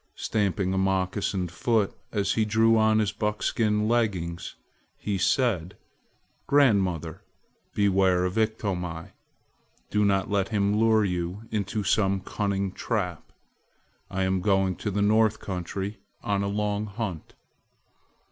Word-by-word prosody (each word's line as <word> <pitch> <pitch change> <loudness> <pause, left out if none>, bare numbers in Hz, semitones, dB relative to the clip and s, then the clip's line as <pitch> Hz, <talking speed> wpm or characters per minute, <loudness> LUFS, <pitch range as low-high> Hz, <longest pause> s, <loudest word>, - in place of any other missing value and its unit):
Stamping 100 -3 -1
a 95 - +1
moccasined 95 -1 0
foot 110 +1 +1 0.2
as 100 -2 0
he 110 - +2
drew 110 +1 +3
on 110 0 +4
his 105 -2 +1
buckskin 105 0 0
leggins, 95 -7 -1 0.4
he 100 -2 -2
said: 95 -5 +1 0.7
"Grandmother, 95 - +2 0.5
beware 95 -3 +3
of 90 - -2
Iktomi! 95 -7 -2 0.8
Do 105 0 +2
not 95 -2 +2
let 100 -2 0
him 100 -2 +1
lure 110 -1 +4
you 90 +2 -3
into 105 0 -2
some 100 -1 +2
cunning 100 -1 -2
trap. 90 -5 -3 0.8
I 95 0 -1
am 95 0 0
going 95 -2 +2
to 105 - -3
the 100 0 0
North 110 +1 +3
country 95 +2 -5 0.2
on 100 -1 0
a 100 - -1
long 105 +1 -1
hunt." 100 -6 -5
100 Hz, 125 wpm, -26 LUFS, 95-110 Hz, 0.8 s, on